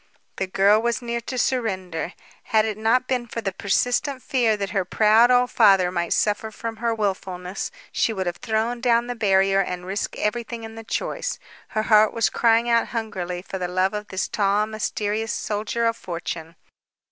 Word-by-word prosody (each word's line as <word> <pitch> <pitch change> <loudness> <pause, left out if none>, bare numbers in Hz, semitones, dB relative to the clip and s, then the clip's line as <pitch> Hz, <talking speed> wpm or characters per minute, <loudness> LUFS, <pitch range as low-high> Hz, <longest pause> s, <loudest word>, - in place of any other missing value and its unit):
The 190 - -1
girl 200 +3 +4
was 235 +1 -1
near 235 0 -2
to 255 +2 -5
surrender. 190 -10 -1 0.3
Had 220 -1 +3
it 215 -1 -2
not 230 +4 +2
been 250 -2 -1
for 230 - -5
the 195 -3 -2
persistent 245 +7 0
fear 235 -5 +2
that 200 -1 -3
her 195 -3 +1
proud 220 +5 +4
old 250 0 +3
father 195 -5 +5
might 175 -2 -2
suffer 210 +1 +1
from 225 +1 -6
her 235 +1 0
wilfulness, 190 -3 -3 0.2
she - - +1
would 190 -4 -3
have 175 0 -3
thrown 230 +1 -1
down 235 -1 +3
the 245 - -3
barrier 195 -3 +3
and 180 -1 -4
risked 195 +2 -3
everything 230 +1 -2
in 225 0 -8
the 225 0 -9
choice. - - -3 0.3
Her 215 - -1
heart 215 -1 +5
was 230 -1 +2
crying 230 0 +3
out 235 -1 +3
hungrily 185 -6 -4
for 190 - -6
the 180 - -2
love 185 +2 +1
of 210 0 -4
this 190 +1 -2
tall, 205 0 +1
mysterious 215 0 -2
soldier 215 +3 -2
of 230 0 +2
fortune. 170 -4 -6
215 Hz, 185 wpm, -23 LUFS, 195-230 Hz, 0.3 s, father